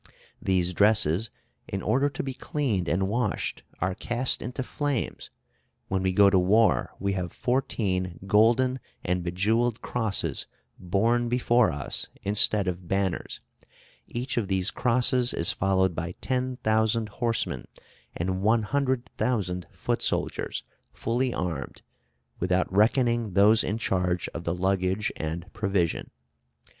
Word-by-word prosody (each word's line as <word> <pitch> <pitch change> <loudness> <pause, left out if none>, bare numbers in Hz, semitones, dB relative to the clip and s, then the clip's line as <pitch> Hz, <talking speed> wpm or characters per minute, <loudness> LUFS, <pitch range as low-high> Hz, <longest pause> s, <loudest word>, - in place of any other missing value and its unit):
These 90 -1 +1
dresses, 105 0 +3 0.4
in 95 -1 -4
order 135 +6 +2
to - - -5
be 135 -1 -4
cleaned 120 - -1
and 95 +2 +1
washed, 110 0 -1 0.2
are 95 +1 +1
cast 120 +5 -1
into 125 +3 -4
flames.... 145 -1 -3 0.6
When 95 -1 0
we 95 0 +1
go 100 +1 +6
to 95 - +5
war, 105 +5 +3
we 100 +1 0
have 90 -3 -3
fourteen 95 -9 -1
golden 115 +6 +3 0.2
and 90 0 0
bejewelled 110 +7 +1
crosses 110 -4 -2 0.3
borne 115 +6 +1
before 120 -1 +3
us 70 -2 -4 0.2
instead 100 0 +2
of 90 -1 -3
banners; 95 -1 -1 0.7
each 125 +3 -4
of 110 -4 +1
these 95 0 +1
crosses 125 0 +2
is 85 - +3
followed 95 -1 +1
by 85 +2 -4
10,000 115 -4 0
horsemen, 115 +2 -2 0.5
and 95 +2 -1
100,000 115 -4 0
foot - - -2
soldiers - - -1 0.3
fully 125 +3 -1
armed, 85 - -4 0.6
without 90 +1 0
reckoning 115 0 +3
those 105 +4 +5
in 105 - -1
charge 90 -4 0
of 85 - -7
the 85 - 0
luggage 95 +2 0
and 85 +5 -5
provision. 100 -6 -1
105 Hz, 125 wpm, -27 LUFS, 90-120 Hz, 0.7 s, go